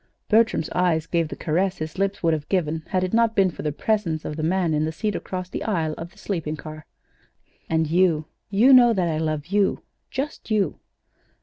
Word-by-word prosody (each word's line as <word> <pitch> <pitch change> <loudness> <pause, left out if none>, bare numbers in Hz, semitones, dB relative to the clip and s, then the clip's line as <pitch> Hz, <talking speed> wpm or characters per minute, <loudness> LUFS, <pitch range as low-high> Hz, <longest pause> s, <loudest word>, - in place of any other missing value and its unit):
Bertram's 220 -7 +3
eyes 170 -3 +1
gave 170 -2 0
the - - -7
caress 180 +4 0
his 155 +4 -6
lips 195 0 -1
would 165 -1 +3
have 155 -2 -4
given 160 -4 0
had 185 -2 0
it 185 - -2
not 230 -1 +3
been 190 -2 +3
for - - -8
the 150 - -1
presence 170 -2 -1
of 150 - -4
the 155 - -4
man 170 0 +1
in 150 0 +1
the 160 - -1
seat 210 +6 -2
across 185 -2 -4
the - - -5
aisle 165 -8 -1
of 170 +1 -8
the - - -23
sleeping 165 -6 -3
car. 155 0 -10 0.8
"And 160 0 +2
you 165 -2 +2 0.2
you 225 +7 +5
know 250 -2 +8
now 235 - +3
that 185 -4 +1
I 155 -2 -1
love 155 -2 -2
you 200 +2 +1 0.3
just 275 -1 -5
you?" 205 -7 0
175 Hz, 215 wpm, -24 LUFS, 155-200 Hz, 0.8 s, know